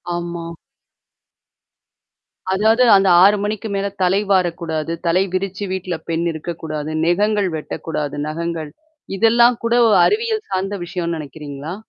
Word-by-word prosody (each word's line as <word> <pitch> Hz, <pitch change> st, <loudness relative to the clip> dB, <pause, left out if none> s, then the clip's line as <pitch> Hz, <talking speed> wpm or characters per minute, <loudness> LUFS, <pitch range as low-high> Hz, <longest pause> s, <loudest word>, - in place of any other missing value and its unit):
ஆமா. 170 Hz, -1 st, -5 dB, 2.1 s
அதாவது 220 Hz, +5 st, +3 dB
அந்த 195 Hz, 0 st, +3 dB, 0.2 s
6 205 Hz, +2 st, +5 dB
மணிக்கு 215 Hz, +1 st, -3 dB
மேல 200 Hz, 0 st, -1 dB, 0.2 s
தலை 185 Hz, +2 st, +3 dB
வாரக்கூடாது. 170 Hz, -4 st, 0 dB
தலை 175 Hz, +3 st, +3 dB
விரித்து 195 Hz, +1 st, -3 dB
வீட்டல 185 Hz, -2 st, -3 dB
பெண் 165 Hz, +1 st, -1 dB
இருக்கக்கூடாது. 155 Hz, -1 st, -5 dB
நகங்கள் 205 Hz, +3 st, +1 dB
வெட்டக்கூடாது, 150 Hz, -1 st, -4 dB
நகங்கள். 165 Hz, -1 st, -4 dB, 0.5 s
இதெல்லாம் 235 Hz, +3 st, +4 dB
கூட 230 Hz, 0 st, +1 dB
ஒரு 205 Hz, -3 st, +4 dB
அறிவியல் 440 Hz, 0 st, 0 dB
சார்ந்த 195 Hz, +2 st, -2 dB
விஷயன்னு 170 Hz, -1 st, -3 dB
நினைக்கிறீங்களா? 145 Hz, +1 st, -7 dB
180 Hz, 115 wpm, -19 LUFS, 165-205 Hz, 2.1 s, 6